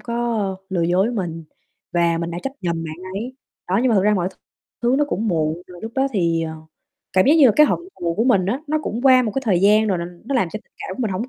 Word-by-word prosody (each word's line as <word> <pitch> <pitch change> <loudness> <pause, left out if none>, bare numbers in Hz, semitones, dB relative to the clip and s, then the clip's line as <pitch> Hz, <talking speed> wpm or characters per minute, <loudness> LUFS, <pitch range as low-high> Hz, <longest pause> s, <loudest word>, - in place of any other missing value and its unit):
có, 235 - -5 0.2
ơ, 195 -3 -1
lừa 180 -3 -1
dối 180 +4 +2
với 245 - -3
mình 165 -4 -4 0.5
và 170 -1 +2
mình 170 0 -3
đã 170 - -4
trách 270 - -3
nhầm 170 -2 -2
bạn 155 0 -6 0.2
ấy. 240 +6 -5 0.3
Đó, 190 +3 +2
nhưng 260 - +3
mà 230 - +3
thực 195 - +3
ra 210 0 +4
mọi 185 -2 0
th - - -17 0.5
thứ 240 +2 +3
nó 295 - +3
cũng 220 +3 -1
muộn 160 0 -1
rồi, 180 -1 -12
lúc 225 +1 -6
đó 270 +1 +2
thì, 170 -4 +1
ờ, 160 -1 -4 0.6
cảm 185 - +4
giác 295 - +6
như 290 -5 +7
là 220 - +5
cái 300 - +7
hận - - 0 0.2
thù 170 -1 -1
của 225 +6 +1
mình 200 -8 +3
á, 250 +7 -1
nó 310 +1 0
cũng 235 -1 -4
qua 255 -2 +6
một 220 -4 -2
cái 270 - -1
thời 190 -7 +2
gian 210 +3 +5
rồi 190 -3 +1
là 170 - -3 0.2
nó 275 +3 -3
làm 195 -8 +2
cho 215 - -5
tình - - -40
cảm 185 - -6
của - - -6
mình 220 - -1
hổng 210 +7 -3
195 Hz, 300 wpm, -21 LUFS, 175-240 Hz, 0.6 s, như